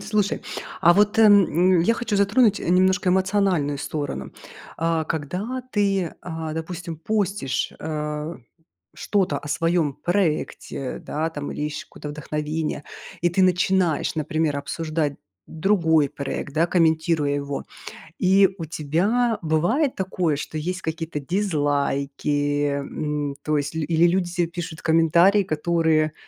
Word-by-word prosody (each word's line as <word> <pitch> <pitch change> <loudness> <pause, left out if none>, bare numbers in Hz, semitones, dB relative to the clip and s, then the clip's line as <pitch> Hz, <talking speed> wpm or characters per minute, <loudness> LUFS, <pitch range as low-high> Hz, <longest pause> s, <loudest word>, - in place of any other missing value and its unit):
Слушай, 205 0 -1 0.4
а 170 - +7
вот 210 +2 +3
эм, 205 -3 +7 0.3
м, - - +4
я 175 +7 +3
хочу 230 -2 -2
затронуть, 205 +2 +3
э, - - -4
немножко 185 +1 +3
эмоциональную 185 -6 +1
сторону. 140 - -4 0.4
А 165 -1 0
когда 180 - -3
ты, 195 -4 +1
а, 160 -2 -5
допустим, 165 0 -5
постишь, 195 -4 -1
э, 150 +1 -3 0.6
что-то 190 -8 0
о 145 - -8
своём 165 -1 +1
проекте, 165 -7 -2
да, 155 +2 -3
там, 145 -3 -6
или - - -5
ищешь 150 0 -4
какое-то 150 - -9
вдохновение, 150 +1 -3 0.4
и 175 - +3
ты 175 +3 +1
начинаешь, 180 -2 +2
например, 155 -1 0
обсуждать 155 0 -2 0.3
другой 160 -4 +2
проект, 140 -1 -5
да, 165 +3 +2
комментируя 160 -3 +2
его. 140 0 -4 0.5
И 190 +1 +5
у 165 - -5
тебя 190 +11 0
бывает 175 - +1
такое, 180 -5 -1
что 155 - -5
есть 180 +4 -3
какие-то 160 -1 -4
дизлайки, 145 -3 0
м. 145 0 -3
То 155 -1 +1
есть 145 +2 -3
ль 160 - -1
или 165 +1 +4
люди 175 0 0
тебе 175 -1 0
пишут 170 -2 -6
комментарии, 170 +5 +4
которые, 160 -2 +1
165 Hz, 130 wpm, -23 LUFS, 150-185 Hz, 0.6 s, а